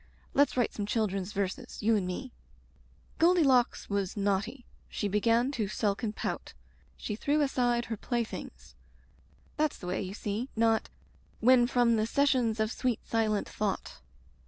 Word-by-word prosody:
Let's 285 Hz, -2 st, +3 dB
write 245 Hz, -, +1 dB
some 205 Hz, -1 st, -4 dB
children's 205 Hz, -3 st, -1 dB
verses, 200 Hz, +5 st, -4 dB
you 225 Hz, +1 st, +4 dB
and 195 Hz, -4 st, 0 dB
me 245 Hz, +8 st, -5 dB, 0.9 s
Goldilocks 310 Hz, -8 st, +4 dB
was 200 Hz, -1 st, -2 dB
naughty, 205 Hz, +6 st, -1 dB, 0.2 s
she 205 Hz, -, -2 dB
began 230 Hz, +5 st, +2 dB
to 225 Hz, -7 st, -2 dB
sulk 200 Hz, 0 st, -1 dB
and 215 Hz, -3 st, -2 dB
pout. -, -, -4 dB, 0.4 s
She 210 Hz, -, -4 dB
threw 285 Hz, +7 st, +1 dB
aside 245 Hz, -4 st, +1 dB
her 225 Hz, -, -4 dB
playthings— 235 Hz, +1 st, -4 dB, 0.4 s
' -, -, -32 dB
That's 305 Hz, -1 st, +1 dB
the -, -, -10 dB
way, 180 Hz, +1 st, -2 dB
you 190 Hz, 0 st, -5 dB
see, 215 Hz, +5 st, -3 dB
not 225 Hz, 0 st, +2 dB, 0.2 s
" -, -, -32 dB
* -, -, -34 dB
When 245 Hz, -2 st, +6 dB
from 240 Hz, -2 st, +3 dB
the 215 Hz, 0 st, +1 dB
sessions 250 Hz, -4 st, +2 dB
of 220 Hz, +1 st, +1 dB
sweet 245 Hz, -3 st, -2 dB
silent 215 Hz, -2 st, 0 dB
thought.' 210 Hz, -2 st, -3 dB
225 Hz, 160 wpm, -30 LUFS, 205-250 Hz, 0.9 s, When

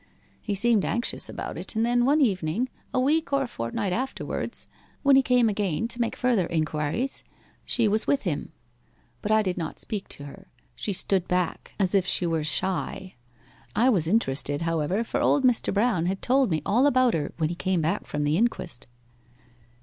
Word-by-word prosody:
He 205 Hz, -3 st, -2 dB
seemed 220 Hz, 0 st, +4 dB
anxious 235 Hz, +1 st, -2 dB
about -, -, -6 dB
it; -, -, -6 dB
and 225 Hz, +1 st, +2 dB
then 240 Hz, 0 st, +2 dB
one 295 Hz, +3 st, +3 dB
evening, 195 Hz, -, 0 dB, 0.2 s
a 255 Hz, -, 0 dB
week 295 Hz, +4 st, +1 dB
or 275 Hz, -1 st, +2 dB
fortnight 180 Hz, -, -3 dB
afterwards, 260 Hz, +5 st, -4 dB, 0.4 s
when 280 Hz, -1 st, +6 dB
he 270 Hz, -, +7 dB
came 250 Hz, -2 st, +3 dB
again 205 Hz, -1 st, -1 dB
to 240 Hz, 0 st, -3 dB
make 230 Hz, -, -1 dB
further 235 Hz, -9 st, +1 dB
inquiries, 155 Hz, -, -2 dB, 0.4 s
she 235 Hz, -3 st, +2 dB
was 215 Hz, +2 st, 0 dB
with 280 Hz, -, +2 dB
him. -, -, -3 dB, 0.7 s
But 210 Hz, -, -2 dB
I 215 Hz, 0 st, +4 dB
did 185 Hz, -2 st, -2 dB
not 160 Hz, -2 st, -4 dB
speak 205 Hz, -3 st, -5 dB
to 145 Hz, -, -8 dB
her 190 Hz, +7 st, -11 dB, 0.3 s
she 210 Hz, -, -3 dB
stood 190 Hz, -1 st, +1 dB
back, 180 Hz, -1 st, -2 dB
as 190 Hz, -1 st, +2 dB
if 195 Hz, -2 st, +2 dB
she 180 Hz, -, +3 dB
were 165 Hz, -2 st, 0 dB
shy. 185 Hz, +3 st, -1 dB, 0.6 s
I 250 Hz, +3 st, +4 dB
was 170 Hz, -8 st, +1 dB
interested, 145 Hz, -6 st, 0 dB
however, 165 Hz, +5 st, 0 dB
for -, -, -2 dB
old 285 Hz, -, +3 dB
Mr. 250 Hz, -3 st, +3 dB
Brown 205 Hz, -5 st, +1 dB
had 190 Hz, +1 st, -3 dB
told 260 Hz, -1 st, +3 dB
me 155 Hz, -3 st, -1 dB
all 245 Hz, +7 st, +3 dB
about 255 Hz, -3 st, +3 dB
her 150 Hz, -3 st, -2 dB
when 155 Hz, -2 st, 0 dB
he 175 Hz, -, -3 dB
came 185 Hz, -1 st, 0 dB
back 170 Hz, +7 st, -1 dB
from 150 Hz, 0 st, -2 dB
the 145 Hz, +2 st, +1 dB
inquest. 185 Hz, -, -2 dB
200 Hz, 190 wpm, -26 LUFS, 170-240 Hz, 0.7 s, he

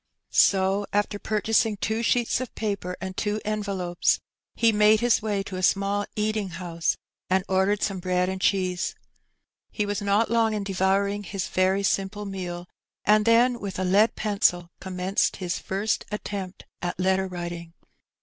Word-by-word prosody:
So 195 Hz, +1 st, +3 dB
after 205 Hz, 0 st, 0 dB
purchasing 215 Hz, 0 st, +1 dB
two 220 Hz, +3 st, -1 dB
sheets 240 Hz, +1 st, +1 dB
of 255 Hz, -, -6 dB
paper 200 Hz, -4 st, -3 dB
and 190 Hz, -1 st, -5 dB
two 210 Hz, +1 st, -1 dB
enve 215 Hz, -1 st, -2 dB
lopes, 180 Hz, -3 st, +1 dB, 0.4 s
he 230 Hz, -1 st, +4 dB
made 210 Hz, 0 st, +5 dB
his 240 Hz, 0 st, +3 dB
way 205 Hz, -2 st, -1 dB
to 190 Hz, -1 st, -6 dB
a -, -, -3 dB
small 200 Hz, +2 st, +1 dB
eating 215 Hz, -2 st, -1 dB
house 170 Hz, -1 st, -2 dB, 0.3 s
and 190 Hz, 0 st, +2 dB
ordered 190 Hz, +2 st, +1 dB
some 195 Hz, -3 st, -1 dB
bread 180 Hz, 0 st, 0 dB
and 190 Hz, 0 st, -4 dB
cheese. 185 Hz, -2 st, 0 dB, 0.7 s
He 210 Hz, -, -2 dB
was 205 Hz, 0 st, -2 dB
not 205 Hz, +3 st, +2 dB
long 225 Hz, -2 st, +2 dB
in 205 Hz, -, -2 dB
devouring 195 Hz, +1 st, +1 dB
his 195 Hz, -2 st, -4 dB
very 190 Hz, +2 st, +2 dB
simple 195 Hz, +1 st, -1 dB
meal, 180 Hz, -3 st, -5 dB, 0.4 s
and 210 Hz, 0 st, +4 dB
then 240 Hz, +1 st, +4 dB
with 200 Hz, -3 st, -5 dB
a 185 Hz, -, -1 dB
lead 200 Hz, +5 st, +3 dB
pencil 180 Hz, -5 st, +1 dB
commenced 185 Hz, +1 st, 0 dB
his 180 Hz, -2 st, -3 dB
first 200 Hz, +3 st, -1 dB
attempt 200 Hz, -3 st, -5 dB, 0.2 s
at 175 Hz, 0 st, -3 dB
letter 190 Hz, +1 st, +2 dB
writing. 175 Hz, -2 st, -6 dB
195 Hz, 160 wpm, -25 LUFS, 185-210 Hz, 0.7 s, made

